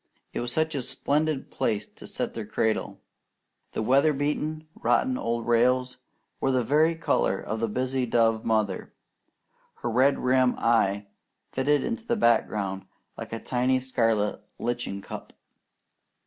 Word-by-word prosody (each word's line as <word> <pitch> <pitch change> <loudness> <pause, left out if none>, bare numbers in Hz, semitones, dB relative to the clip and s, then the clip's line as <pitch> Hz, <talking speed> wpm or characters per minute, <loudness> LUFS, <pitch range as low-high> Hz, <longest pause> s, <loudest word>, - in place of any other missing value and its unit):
It - - -2
was 120 0 -3
such 160 +3 0
a 140 - -1
splendid 150 +3 -1
place 105 -2 -1
to - - -14
set - - -3
their 115 - -4
cradle. 110 0 -1 0.7
The - - -1
weatherbeaten, 150 +4 +1
rotting 260 -1 +1
old 115 - -2
rails 125 +2 +2 0.4
were 135 - +1
the 130 -2 +2
very 155 +7 +3
colour 160 -11 +1
of 110 - -4
the 115 - 0
busy 130 +3 -1
dove 115 -1 +2
mother. 110 -4 -1 0.8
Her 120 - -3
red 130 +4 +4
rimmed 130 0 +2
eye 105 -3 +2 0.5
fitted 140 +1 +2
into 235 0 -4
the 235 - +2
background 100 - +1 0.3
like - - -8
a 115 - -3
tiny 125 +2 +1
scarlet 115 -5 0 0.2
lichen 120 -5 -3
cup. - - -8
125 Hz, 140 wpm, -27 LUFS, 115-140 Hz, 0.8 s, red